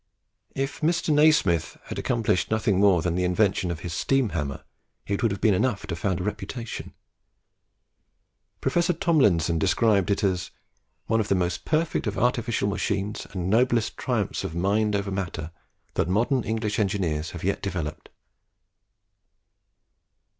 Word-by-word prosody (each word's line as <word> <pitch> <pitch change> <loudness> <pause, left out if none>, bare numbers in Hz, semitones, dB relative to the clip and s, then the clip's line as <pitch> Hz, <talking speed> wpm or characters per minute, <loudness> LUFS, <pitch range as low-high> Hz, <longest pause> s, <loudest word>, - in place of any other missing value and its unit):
If 135 +4 -3
Mr. 165 0 +1
Nasmyth 145 - +3
had - - -5
accomplished 110 -6 0
nothing 110 -3 +1
more 95 -5 +4
than 85 - 0
the 90 +1 0
invention 90 0 +1
of 85 -2 -4
his 85 -2 -5
steam 135 +5 +1
hammer, 75 -5 -4 0.4
it 100 -1 -2
would 115 - +3
have 100 -1 -3
been 110 - +4
enough 105 +1 0
to 90 -5 -4
found 90 +2 -1
a - - -3
reputation. 105 +4 -5 1.7
Professor 175 +1 +2
Tomlinson 100 - +2
describes 100 +1 +2
it 100 - 0
as 90 -3 0 0.6
"one 115 +1 +1
of 105 - 0
the 100 - +2
most 90 -1 -1
perfect 155 -5 0
of 105 - -2
artificial 120 -3 +1
machines 100 0 -2
and 90 -2 -4
noblest 115 +2 +2
triumphs - - -2
of 80 - -5
mind 105 +4 +1
over 100 0 -2
matter 90 -5 -4 0.4
that 85 - 0
modern 120 +7 +2
English 110 -2 -1
engineers 90 -6 0
have 85 - -8
yet 100 +2 0
developed." 85 -6 -4
100 Hz, 145 wpm, -25 LUFS, 90-115 Hz, 1.7 s, more